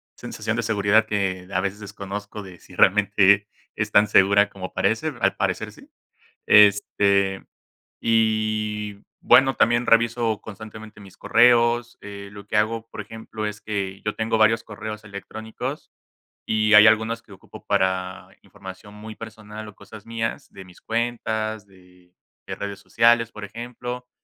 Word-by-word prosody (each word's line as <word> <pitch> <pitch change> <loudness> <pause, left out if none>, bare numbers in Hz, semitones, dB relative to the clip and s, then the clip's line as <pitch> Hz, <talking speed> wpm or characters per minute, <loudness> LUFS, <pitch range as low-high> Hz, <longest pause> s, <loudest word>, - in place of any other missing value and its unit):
sensación 115 - -4
de 115 - -1
seguridad 110 0 +2
que 95 -3 -2
a 90 - 0
veces 100 +1 -3
desconozco 105 0 -7
de 90 -2 -13
si - - -16
realmente 100 0 +4 0.3
es - - -3
tan 105 +1 +5
segura 100 +1 +4
como 95 -2 -8
parece, - - 0
al - - +2
parecer - - -2
sí. - - -18 0.6
Este, 100 -1 +4 0.6
y 110 -2 0 0.2
bueno, 135 0 +5
también 120 +1 +2
reviso 115 -1 +2
constantemente 110 0 -11
mis 95 -2 -15
correos, 120 0 +3
eh, 100 -1 -9
lo 100 0 -11
que 105 - -2
hago, 110 +1 0
por - - -8
ejemplo, 110 0 -7
es 105 0 -6
que 100 -2 -4
yo 105 - -3
tengo 110 0 0
varios 110 +1 +3
correos 110 0 -8
electrónicos 110 +2 -7 0.5
y 110 0 +2
hay 105 +1 +9
algunos 110 +1 +1
que 105 - -18
ocupo 95 - -14
para 95 0 -1
información 100 +1 -12
muy 110 +1 -10
personal 110 -1 -10
o 105 - -14
cosas 105 +1 -13
mías 115 -1 -4
de 95 -1 -11
mis 90 -1 -18
cuentas, 110 -2 -3
de 90 -2 -23 0.3
de - - -5
redes 100 0 -6
sociales, 115 +2 +3
por 105 - -9
ejemplo, 120 +3 -7
105 Hz, 150 wpm, -23 LUFS, 100-110 Hz, 0.6 s, hay